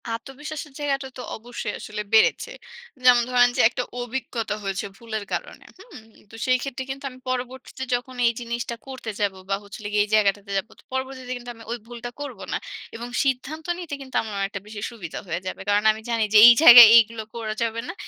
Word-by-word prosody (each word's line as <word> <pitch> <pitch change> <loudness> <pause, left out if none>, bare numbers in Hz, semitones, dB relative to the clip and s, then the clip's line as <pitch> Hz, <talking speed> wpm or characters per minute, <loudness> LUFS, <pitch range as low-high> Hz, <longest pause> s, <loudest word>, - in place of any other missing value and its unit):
আত্মবিশ্বাসের 290 +5 -8
জায়গাটা 275 -2 -1
তো - - -6 0.2
অবশ্যই 240 +2 -6
আসলে 210 0 -6
বেড়েছে। 225 - +4 0.5
যেমন 245 -1 +7
ধরেন 245 -1 +5
যে, - - +4
একটা 250 - -3 0.2
অভিজ্ঞতা 240 -3 -4
হয়েছে 195 0 -3
ভুলের 220 -3 -5
কারণে - - -5
হুম? 385 - -13 0.3
তো - - -11
সেই 255 -1 +3
ক্ষেত্রে 265 -1 -5
কিন্তু 275 +1 -6
আমি 255 - -15
পরবর্তীতে 255 +1 -5
যখন 250 +1 -6
এই 235 - +2
জিনিসটা 235 0 -4
করতে 260 -4 -6
যাব 205 -2 +1 0.2
বা 195 - +2
হচ্ছিলগে 205 +1 -8
এই 205 - +1
জায়গাটাতে 200 -1 +1
যাবো 195 +4 -4
তো - - -20
পরবর্তীতে 260 -1 -4
কিন্তু 245 0 -8
আমি 225 - -13
ওই 240 - -2
ভুলটা 240 0 -7
করব 290 - -7
না - - +1 0.4
এবং 235 +1 -6 0.2
সিদ্ধান্ত 275 +4 -2
নিতে 335 -5 -7
কিন্তু 265 -1 -11
আমার 220 -1 -7
অনেকটা 200 0 -3
বেশি 210 -1 -8
সুবিধা 190 -9 -7
হয়ে 170 +1 -3
যাবে। 185 - -5
কারণ 205 +1 +3
আমি 220 - -7
জানি 230 -1 +1
যে, - - +8
এই 240 - +10
জায়গায় 240 -5 +12
এইগুলো 230 -1 +2
করা 220 -2 -3
যাবে 230 0 -2
না। - - -4
240 Hz, 195 wpm, -24 LUFS, 220-260 Hz, 0.5 s, জায়গায়